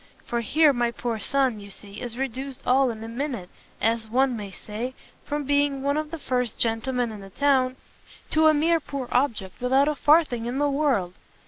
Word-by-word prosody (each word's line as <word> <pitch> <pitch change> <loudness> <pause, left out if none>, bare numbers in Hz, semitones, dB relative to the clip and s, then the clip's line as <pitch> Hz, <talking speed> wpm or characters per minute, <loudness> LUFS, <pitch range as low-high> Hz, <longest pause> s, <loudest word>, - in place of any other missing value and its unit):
For 235 0 -1
here 300 +6 +4
my 240 -1 +1
poor 235 0 -3
son, 260 0 +1
you 200 0 -11
see, 200 +1 -11
is 240 -1 -5
reduced 265 0 -4
all 265 +1 +4
in 225 -1 -6
a - - -6
minute, 235 -6 -4 0.3
as 225 0 0
one 260 +2 +2
may 205 -3 -6
say, 220 +6 -6 0.3
from 295 0 -2
being 285 -1 +1
one 280 +1 +1
of 305 0 -2
the 330 - -5
first 250 -5 -2
gentlemen 235 +1 0
in 210 -2 -8
the 195 - -10
town, 260 +2 +2 0.6
to 315 0 +5
a 310 - +6
mere 330 +3 +3
poor 280 -4 -5
object, 230 -8 0
without 265 +3 +3
a 300 - +2
farthing 290 -6 +3
in 245 +2 -2
the 290 0 +2
world!" 270 -12 +1
255 Hz, 200 wpm, -25 LUFS, 225-285 Hz, 0.6 s, a